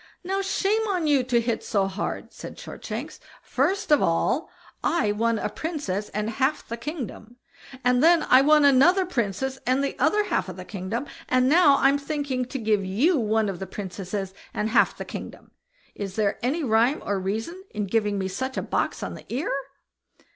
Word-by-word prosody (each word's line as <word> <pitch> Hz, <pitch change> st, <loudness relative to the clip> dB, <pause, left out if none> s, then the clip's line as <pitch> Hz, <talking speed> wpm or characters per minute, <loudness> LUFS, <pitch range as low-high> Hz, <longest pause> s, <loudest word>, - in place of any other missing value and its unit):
"Now 385 Hz, +2 st, -1 dB
shame 410 Hz, +3 st, 0 dB
on 365 Hz, -5 st, 0 dB
you 290 Hz, -3 st, +4 dB
to 245 Hz, -2 st, +2 dB
"hit 235 Hz, -1 st, -1 dB
so 200 Hz, -3 st, +1 dB
hard!" 195 Hz, +1 st, -4 dB
said -, -, -9 dB
Shortshanks. -, -, -7 dB, 0.2 s
"First 320 Hz, +7 st, 0 dB
of 295 Hz, -, +6 dB
all 165 Hz, -, +1 dB, 0.3 s
I 275 Hz, -12 st, +2 dB
won 230 Hz, +2 st, +1 dB
a -, -, -1 dB
princess 290 Hz, -, -4 dB
and 210 Hz, +1 st, -2 dB
half 265 Hz, +5 st, 0 dB
the 230 Hz, -, -4 dB
kingdom, 240 Hz, -4 st, -7 dB, 0.5 s
and 250 Hz, 0 st, +3 dB
then 335 Hz, -1 st, +6 dB
I 255 Hz, -, +6 dB
won 300 Hz, +1 st, +5 dB
another 325 Hz, +8 st, +5 dB
princess 260 Hz, -, -2 dB
and 260 Hz, +2 st, +1 dB
the 280 Hz, -, -2 dB
other 420 Hz, 0 st, +3 dB
half 190 Hz, -, -1 dB
of 185 Hz, -, -8 dB
the 185 Hz, -, -8 dB
kingdom; 210 Hz, +7 st, -4 dB, 0.2 s
and 255 Hz, 0 st, +3 dB
now 295 Hz, -1 st, +6 dB
I'm 275 Hz, +1 st, +3 dB
thinking 280 Hz, -3 st, -2 dB
to 255 Hz, -, -5 dB
give 215 Hz, -4 st, +1 dB
you 255 Hz, -, +2 dB
one 220 Hz, -1 st, +1 dB
of 190 Hz, -3 st, -4 dB
the 190 Hz, -, -5 dB
princesses 190 Hz, 0 st, -5 dB, 0.2 s
and 210 Hz, +1 st, 0 dB
half 220 Hz, -, +3 dB
the -, -, -6 dB
kingdom. -, -, -9 dB, 0.4 s
Is 195 Hz, -2 st, -6 dB
there 210 Hz, -2 st, 0 dB
any 290 Hz, +7 st, 0 dB
rhyme 235 Hz, +4 st, +2 dB
or 200 Hz, -1 st, 0 dB
reason 225 Hz, -, -4 dB
in 210 Hz, -1 st, -3 dB
giving 210 Hz, 0 st, 0 dB
me 190 Hz, -1 st, -1 dB
such 260 Hz, +8 st, -4 dB
a -, -, -1 dB
box -, -, -1 dB
on -, -, -4 dB
the -, -, -12 dB
ear?" 260 Hz, +7 st, -1 dB
250 Hz, 190 wpm, -25 LUFS, 210-295 Hz, 0.5 s, of